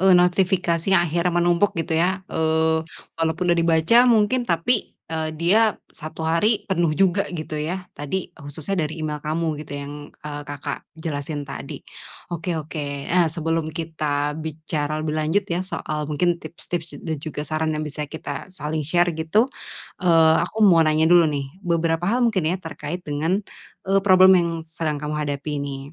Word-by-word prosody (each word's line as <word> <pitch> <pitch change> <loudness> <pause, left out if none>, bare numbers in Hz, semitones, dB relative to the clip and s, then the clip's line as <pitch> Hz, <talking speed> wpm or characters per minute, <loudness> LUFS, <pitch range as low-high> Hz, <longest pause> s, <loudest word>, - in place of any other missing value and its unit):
eee, 185 -1 +6
notifikasi 180 -2 +2
yang 190 -3 +5
akhirnya 170 +2 0
menumpuk 175 +3 +2
gitu, 165 0 -2
ya. 190 +2 0
Eee, 160 0 +2 0.3
walaupun 165 +2 0
udah 170 - +1
dibaca 170 +10 +5
mungkin, 230 +2 +4
tapi, 175 +8 0
eee, 160 -1 -3
dia 205 +7 +3 0.2
1 155 +1 -7
hari 185 +7 +2
penuh 170 -5 0
juga 195 0 +2
gitu, 155 -3 -5
ya. 180 +5 -3
Tadi 175 +5 -4
khususnya 155 +3 -3
dari 160 +1 -5
email 150 -1 -3
kamu 155 0 -2
gitu 150 -1 -9
yang, 140 0 -6 0.2
eee, 145 -1 -7
Kakak 145 0 -4 0.2
jelasin 145 -2 -4
tadi. 140 +1 -8 0.5
Oke 170 0 -2
oke, 145 -3 -4
eee, 175 -1 +3
sebelum 165 0 -1
kita 155 -3 -2
bicara 155 -1 -3
lebih 155 0 -2
lanjut, 165 +6 +1
ya, 175 -2 -2
soal 155 -5 -3
mungkin 170 +3 +1
tips-tips 170 +1 -4
da 160 - -2
dan - - -2
juga 150 -1 -5
saran 155 +1 -1
yang 155 - -2
bisa 150 0 -5
kita 145 0 -6
saling 155 -3 -4
share 175 +4 +2
gitu, 160 +8 +2 0.6
eee, 165 -3 +5
aku 215 +6 +1
mau 175 -5 +6
nanya 155 0 +3
dulu, 170 0 +6
nih, 140 -2 -3
beberapa 170 -1 0
hal 245 +3 +2
mungkin, 190 -9 +1
ya, 180 - 0
terkait 170 0 -6
dengan, 160 +7 -1 0.4
eee, 195 0 +3
problem 190 -1 +7
yang 170 -1 0
sedang 160 -1 -3
kamu 150 +1 -4
hadapi 145 0 -3
ini. 140 0 -6
160 Hz, 170 wpm, -23 LUFS, 150-180 Hz, 0.6 s, problem